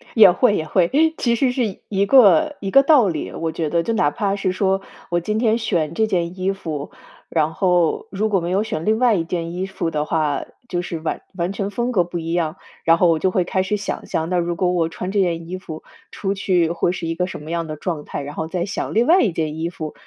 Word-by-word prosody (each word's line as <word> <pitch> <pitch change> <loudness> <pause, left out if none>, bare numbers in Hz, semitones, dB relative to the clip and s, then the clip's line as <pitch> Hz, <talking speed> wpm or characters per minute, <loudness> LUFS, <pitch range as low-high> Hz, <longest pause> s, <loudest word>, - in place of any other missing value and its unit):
也 205 -5 +9
会， 210 +2 +3
也 155 - -2
会， 170 +2 +2 0.3
其 235 -1 +1
实 255 +1 +2
是 235 -7 -2
一 200 -1 +1
个 275 +6 +5
一 195 -1 -3
个 275 - +7
道 275 -8 +5
理， 160 -4 -3
我 165 -1 -3
觉 160 -2 -2
得 170 +1 +1
就 230 - -1
哪 145 -9 +2
怕 200 -4 -1
是 195 -2 -1
说 190 +1 0 0.3
我 175 0 +1
今 210 +5 -2
天 225 -1 +2
选 170 -9 -1
这 220 +4 +1
件 180 -2 -2
衣 190 +1 +1
服， 155 -7 -5 0.4
然 160 -1 0
后 180 +2 +1
如 210 +2 -1
果 195 -3 +2
没 170 +1 -3
有 200 +3 +2
选 160 -7 -4
另 220 +1 +2
外 240 -4 +4
一 165 - 0
件 170 0 -4
衣 185 +1 -2
服 195 -4 -3
的 150 0 -1
话， 155 -4 0 0.2
就 175 -4 -2
是 170 -2 -5
完 160 - -3
完 175 +2 -2
全 200 0 -3
风 240 +4 -2
格 185 -7 +3
不 175 0 -6
一 165 0 -3
样。 170 0 -1 0.3
然 165 0 +5
后 180 - +4
我 160 -1 +2
就 190 - +2
会 185 - +1
开 190 +2 -1
始 210 +3 -1
想 200 - -5
象， 160 +1 -2
那 180 - +1
如 170 0 -1
果 180 +1 +1
我 165 -2 +1
穿 180 +3 -5
这 205 - +1
件 165 -2 -1
衣 185 +1 -4
服 160 -4 -9 0.3
出 195 -1 -2
去 180 -4 +1
会 175 0 0
是 175 -2 -4
一 165 - -1
个 180 +1 -1
什 165 - -7
么 160 - -7
样 170 -1 -2
的 155 - -5
状 155 -1 -4
态？ - - -5
然 145 +1 -7
后 160 - -3
再 175 +1 -2
想 205 - -4
另 230 +3 +3
外 345 +5 +5
一 205 - +2
件 155 -1 -3
衣 165 +1 -2
服， 155 -3 -7
180 Hz, 280 characters per minute, -21 LUFS, 165-200 Hz, 0.4 s, 也